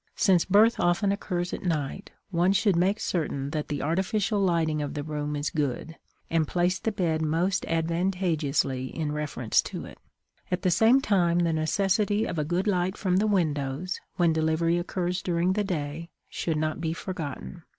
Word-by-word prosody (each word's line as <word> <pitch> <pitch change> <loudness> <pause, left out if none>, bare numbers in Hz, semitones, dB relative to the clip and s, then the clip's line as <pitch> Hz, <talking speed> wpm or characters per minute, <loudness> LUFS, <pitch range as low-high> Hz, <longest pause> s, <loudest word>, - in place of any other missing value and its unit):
Since 185 -4 +3
birth 210 +4 +4
often 175 +3 +2
occurs 180 -3 -2
at - - -4
night, 160 +1 -2 0.2
one 180 +2 +3
should 200 -1 +3
make 190 +5 +2
certain 145 -5 -2
that 150 -1 -3
the 145 - -3
artificial 195 +6 0
lighting 165 -5 +1
of 145 - -4
the 145 - -3
room 150 -1 -3
is 145 +1 -2
good, 150 +2 -2 0.3
and 160 -2 +1
place 180 +1 +1
the 225 - -1
bed 165 -6 0
most 170 +5 0
advantageously 165 -6 0
in 150 +2 -3
reference 150 -6 0
to - - -6
it; - - -12 0.5
at 180 0 -2
the 185 - +3
same 225 +9 +5
time 175 -7 +2
the 170 -2 +2
necessity 200 +6 +1
of 170 - -3
a - - +1
good 175 +5 -1
light 185 -1 0
from 185 -2 +1
the 210 +3 +2
windows, 160 -3 -1 0.2
when 170 -2 +3
delivery 160 +2 +1
occurs 180 0 -2
during 175 +1 +1
the 210 +1 0
day, 165 -3 -4 0.2
should 160 -2 -2
not 155 +1 -2
be 160 -1 -1
forgotten. 150 - -6
170 Hz, 175 wpm, -27 LUFS, 155-185 Hz, 0.5 s, same